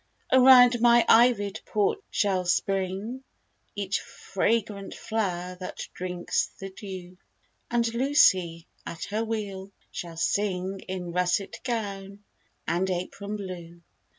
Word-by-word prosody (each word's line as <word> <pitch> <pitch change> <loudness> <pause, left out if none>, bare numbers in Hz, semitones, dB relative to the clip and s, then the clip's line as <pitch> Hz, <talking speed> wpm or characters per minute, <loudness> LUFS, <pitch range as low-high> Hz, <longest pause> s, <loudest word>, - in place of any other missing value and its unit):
Around 250 -2 +7
my 240 0 +6
ivy'd 225 -4 +4
porch 210 - +1
shall 195 -3 +1
spring 195 +7 -1 0.5
Each 200 -2 -1
fragrant 205 0 -2
flower 180 -5 -2
that 185 - -6
drinks 180 -1 -2
the 195 0 -7
dew; 185 -2 -9 0.5
And 235 -1 +1
Lucy, 190 - +3 0.2
at 170 - -7
her 215 +2 0
wheel, 200 -4 -4 0.2
shall 170 -2 -7
sing 190 +1 -1
In 185 -2 -4
russet 180 +2 0
gown 200 -4 -4 0.4
and 175 +3 0
apron 195 +3 -4
blue. 175 -4 -8
195 Hz, 110 wpm, -27 LUFS, 180-225 Hz, 0.5 s, Around